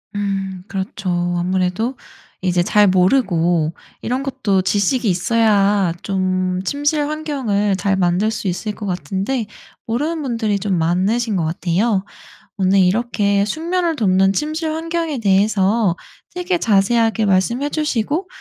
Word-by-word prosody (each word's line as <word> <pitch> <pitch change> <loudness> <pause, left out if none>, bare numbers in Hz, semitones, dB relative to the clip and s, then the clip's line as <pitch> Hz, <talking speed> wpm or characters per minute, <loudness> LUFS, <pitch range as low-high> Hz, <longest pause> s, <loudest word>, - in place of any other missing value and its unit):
음 195 -2 -3
그렇죠. 195 0 -4 0.3
아무래도 185 +7 -1 0.5
이제 180 -1 +1
잘 205 +3 +4
모르고 175 - +2 0.3
이런 255 +3 -2
것도 250 -9 0
지식이 205 +4 +1
있어야 200 -1 +2
좀 185 -1 -1
침실 290 +4 0
환경을 265 -10 -1
잘 195 +1 0
만들 185 +3 +1
수 215 -2 -4
있을 210 +4 -2
거 210 - -7
같은데 190 - -2 0.4
모르는 300 +8 -1
분들이 225 -6 -1
좀 195 -2 -1
많으신 195 +7 +1
거 165 - 0
같아요. 190 +5 0 0.5
오늘 195 +1 +3
이렇게 200 +1 +2
숙면을 335 - -1
돕는 195 -2 +3
침실 310 +3 -2
환경에 325 -3 -2
대해서 200 -1 +2 0.4
되게 360 0 -1
자세하게 225 -1 +2
말씀해 235 +9 +1
주시고 300 - -1
205 Hz, 275 characters per minute, -19 LUFS, 185-250 Hz, 0.5 s, 잘